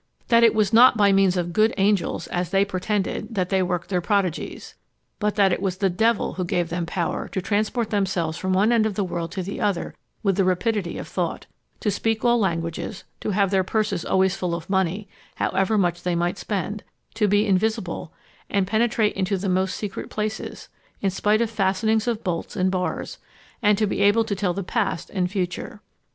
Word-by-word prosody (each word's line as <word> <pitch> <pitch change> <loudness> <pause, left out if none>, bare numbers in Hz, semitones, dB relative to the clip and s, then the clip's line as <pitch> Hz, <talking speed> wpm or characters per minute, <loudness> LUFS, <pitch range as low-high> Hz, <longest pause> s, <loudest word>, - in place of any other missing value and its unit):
That 235 -1 +5
it 230 -1 +5
was 215 -2 +2
not 240 +1 +7
by 205 -2 +5
means 195 -1 +3
of 175 -1 -2
good 220 +3 +3
angels, 200 -1 +1
as 175 -1 -2
they 195 +1 +3
pretended, 200 +3 -2
that 185 -2 0
they 190 -1 +2
worked 180 -1 -2
their 180 -2 0
prodigies; 190 -3 -2 0.5
but 210 -1 0
that 195 -3 +4
it - - -2
was 190 -2 -1
the 195 -1 +1
devil 225 +4 +1
who 185 - -3
gave 175 -1 -1
them 170 0 -2
power 170 -1 -2
to - - -3
transport 215 +4 -1
themselves 185 -6 0
from 185 +2 -2
one 200 +5 +3
end 225 -2 +3
of 210 - -4
the 205 - 0
world 170 -2 -4
to 190 - -3
the 195 - -5
other 200 -4 -1 0.3
with 195 -3 +1
the 195 - +4
rapidity 185 +1 0
of - - -6
thought; - - -3 0.4
to 210 - +1
speak 225 +3 -1
all 240 0 +4
languages; 170 +1 -2 0.2
to - - -3
have 200 -1 +2
their 190 -1 +3
purses 205 -2 -1
always 190 0 +2
full 180 -3 -2
of 170 +3 -7
money, 190 +2 0 0.3
however 195 +3 +1
much 175 -3 +1
they 180 -1 -1
might 175 +3 -1
spend; 205 +1 -3 0.3
to 210 - +1
be 205 +1 +3
invisible, 200 -4 -1 0.4
and 200 -2 +1
penetrate 220 +1 +1
into 195 +1 -1
the 195 +1 -2
most 185 +1 +1
secret 205 -2 -5
places, 215 0 -4 0.3
in 195 - +1
spite 210 +3 +2
of 230 - +1
fastenings 215 +2 +1
of 230 -2 -1
bolts 170 -3 -3
and 185 -2 +1
bars; 180 -1 -3 0.4
and 210 -2 +4
to 215 - +2
be 200 - -2
able 205 +3 +5
to 210 -2 -2
tell 185 -3 -1
the 195 - -3
past 195 -4 -2
and 180 -2 0
future. 185 +1 -3
195 Hz, 205 wpm, -23 LUFS, 180-210 Hz, 0.5 s, not